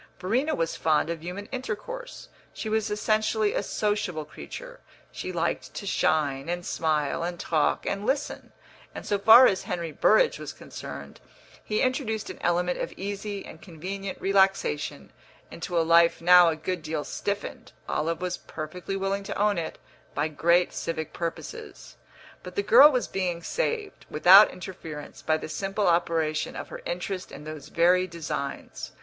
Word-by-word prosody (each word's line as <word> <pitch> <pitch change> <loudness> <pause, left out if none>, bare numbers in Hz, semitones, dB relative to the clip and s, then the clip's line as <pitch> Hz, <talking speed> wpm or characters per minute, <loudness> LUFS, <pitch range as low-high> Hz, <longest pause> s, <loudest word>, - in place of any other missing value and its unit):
Verena 245 +12 0
was 165 0 -1
fond 160 +1 +1
of 165 -2 -5
human 180 +4 -6
intercourse; 265 - -6 0.3
she - - -5
was 220 0 0
essentially 215 0 +1
a - - 0
sociable 205 -7 -1
creature; - - -9 0.3
she 185 - -5
liked 170 -1 -2
to 200 - -5
shine 150 -6 +1
and 175 0 -3
smile 155 -2 0
and 175 0 -3
talk 155 -3 +1
and 200 +1 -2
listen; 275 +5 -2 0.4
and - - -7
so 205 - 0
far 225 +5 +9
as 190 -5 +3
Henry 170 -2 -3
Burrage - - +3
was - - -6
concerned - - -9 0.4
he 215 - 0
introduced 255 -5 -1
an - - -12
element 175 +1 +1
of - - -3
easy 200 +1 -5
and 160 - -12
convenient 190 +3 -6
relaxation 190 - +1 0.4
into 170 +1 -4
a 165 - +2
life 170 0 +5
now 175 0 +7
a 160 - -1
good 175 +2 -3
deal 155 -1 -3
stiffened 200 +5 -4 0.2
(Olive 165 +3 -1
was 180 0 -2
perfectly 170 +5 -6
willing 195 +1 -1
to - - -5
own 205 -2 +2
it) 160 - -5 0.4
by 145 +2 +1
great 170 +4 +2
civic 160 -2 -4
purposes. 175 - -6 0.5
But - - -10
the 405 - 0
girl 465 -11 +8
was 250 -3 0
being 175 -3 -2
saved, 455 - -3
without 185 +7 +8
interference, 170 -5 -8
by 155 0 +1
the - - -7
simple 195 +5 -2
operation 165 -3 +1
of - - -6
her - - -8
interest 195 - -4
in 145 - -9
those 155 -2 -8
very 180 +2 +3
designs. 155 -5 -5
180 Hz, 160 wpm, -27 LUFS, 165-210 Hz, 0.5 s, far